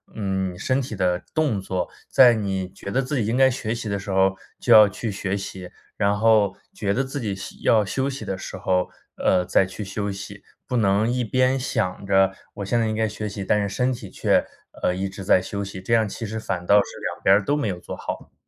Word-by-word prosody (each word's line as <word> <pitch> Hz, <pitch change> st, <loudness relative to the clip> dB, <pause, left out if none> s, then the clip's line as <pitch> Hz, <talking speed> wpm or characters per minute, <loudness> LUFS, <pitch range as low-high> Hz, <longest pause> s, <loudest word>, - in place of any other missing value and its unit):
嗯， 95 Hz, -3 st, -2 dB
身 130 Hz, +7 st, 0 dB
体 120 Hz, -4 st, -5 dB
的 90 Hz, -2 st, 0 dB
动 145 Hz, -11 st, +1 dB
作， 95 Hz, -2 st, -2 dB, 0.2 s
在 125 Hz, -3 st, +7 dB
你 95 Hz, -4 st, -2 dB
觉 100 Hz, +1 st, -9 dB
得 135 Hz, +6 st, +1 dB
自 135 Hz, +3 st, -2 dB
己 115 Hz, -, 0 dB
应 115 Hz, +3 st, 0 dB
该 135 Hz, -, +6 dB
学 115 Hz, -2 st, -3 dB
习 115 Hz, -2 st, -5 dB
的 100 Hz, -1 st, -1 dB
时 100 Hz, -, -9 dB
候 95 Hz, 0 st, +3 dB, 0.2 s
就 -, -, +4 dB
要 105 Hz, -1 st, +9 dB
去 105 Hz, +3 st, -4 dB
学 100 Hz, 0 st, -2 dB
习， 95 Hz, -2 st, -7 dB, 0.3 s
然 100 Hz, 0 st, +2 dB
后 105 Hz, -3 st, +4 dB, 0.2 s
觉 100 Hz, -2 st, -1 dB
得 135 Hz, -, +1 dB
自 135 Hz, +1 st, -5 dB
己 105 Hz, -4 st, -2 dB
休 95 Hz, -, -8 dB
要 110 Hz, -2 st, +4 dB
休 130 Hz, +8 st, -1 dB
息 135 Hz, 0 st, -6 dB
的 95 Hz, -, -2 dB
时 95 Hz, -, -7 dB
候， 90 Hz, -1 st, 0 dB, 0.3 s
呃， 90 Hz, -1 st, +2 dB
再 95 Hz, +1 st, +3 dB
去 95 Hz, +3 st, -7 dB
休 100 Hz, +1 st, -3 dB
息， 100 Hz, +1 st, -8 dB, 0.3 s
不 125 Hz, -, -2 dB
能 105 Hz, -1 st, +3 dB
一 125 Hz, 0 st, 0 dB
边 130 Hz, +3 st, +2 dB
想 105 Hz, -8 st, -2 dB
着 95 Hz, 0 st, +4 dB, 0.2 s
我 100 Hz, -, -5 dB
现 120 Hz, +5 st, +1 dB
在 115 Hz, -, +1 dB
应 110 Hz, -, -1 dB
该 110 Hz, 0 st, +1 dB
学 105 Hz, 0 st, -5 dB
习， 100 Hz, -1 st, -6 dB
但 105 Hz, +2 st, +2 dB
是 100 Hz, -, -1 dB
身 125 Hz, +6 st, 0 dB
体 115 Hz, -5 st, -8 dB
却 -, -, +2 dB, 0.4 s
呃， 90 Hz, -, +1 dB
一 95 Hz, +1 st, -2 dB
直 95 Hz, 0 st, -8 dB
在 95 Hz, -, +5 dB
休 100 Hz, +2 st, -4 dB
息， 95 Hz, -1 st, -7 dB
这 95 Hz, +5 st, -2 dB
样 110 Hz, -2 st, +3 dB
其 115 Hz, -, -6 dB
实 110 Hz, +1 st, -4 dB
反 90 Hz, -5 st, -3 dB
倒 100 Hz, -, +6 dB
是 -, -, +6 dB, 0.3 s
两 -, -, -15 dB
边 95 Hz, -, +6 dB
儿 100 Hz, 0 st, +1 dB
都 145 Hz, -, +2 dB
没 145 Hz, -6 st, -1 dB
有 90 Hz, -3 st, -3 dB
做 -, -, -7 dB
好。 -, -, -7 dB
100 Hz, 265 characters per minute, -23 LUFS, 95-115 Hz, 0.4 s, 要